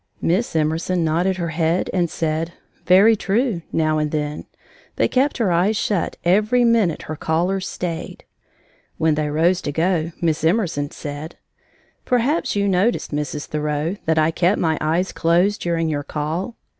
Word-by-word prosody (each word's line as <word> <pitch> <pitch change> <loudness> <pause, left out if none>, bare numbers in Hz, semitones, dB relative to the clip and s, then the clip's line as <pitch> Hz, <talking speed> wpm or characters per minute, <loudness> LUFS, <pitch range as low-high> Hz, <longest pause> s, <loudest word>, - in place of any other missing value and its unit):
Miss 185 +3 0
Emerson 160 +3 0
nodded 175 +4 +1
her 170 -2 -2
head 165 +2 0
and 175 -3 +1
said: 160 +1 -2 0.3
"Very 195 +5 +6
true," 215 -1 0
now 155 -1 +1
and 150 0 0
then, 150 -1 -3 0.5
but - - +1
kept 270 +3 +2
her 220 -6 +1
eyes 185 +6 +2
shut 200 -6 -1
every 215 +7 +3
minute 225 -8 +2
her 155 - -5
callers 180 +5 -1
stayed. 170 -2 -5 0.7
When 160 -1 +2
they 150 0 -1
rose 170 +5 +2
to 145 - -3
go, 165 +1 0
Miss 160 -2 0
Emerson 160 -5 +1
said: 145 +3 -7 0.7
"Perhaps 255 +5 +1
you 200 0 +1
noticed, 195 +5 +1
Mrs. 150 0 -3
Thoreau, 150 +3 -2
that 160 0 +2
I 155 +1 +3
kept 180 +5 +2
my 160 -2 +1
eyes 170 +4 0
closed 175 +5 +1
during 165 -1 0
your 150 -2 -1
call. 160 - -3
170 Hz, 155 wpm, -21 LUFS, 155-190 Hz, 0.7 s, Very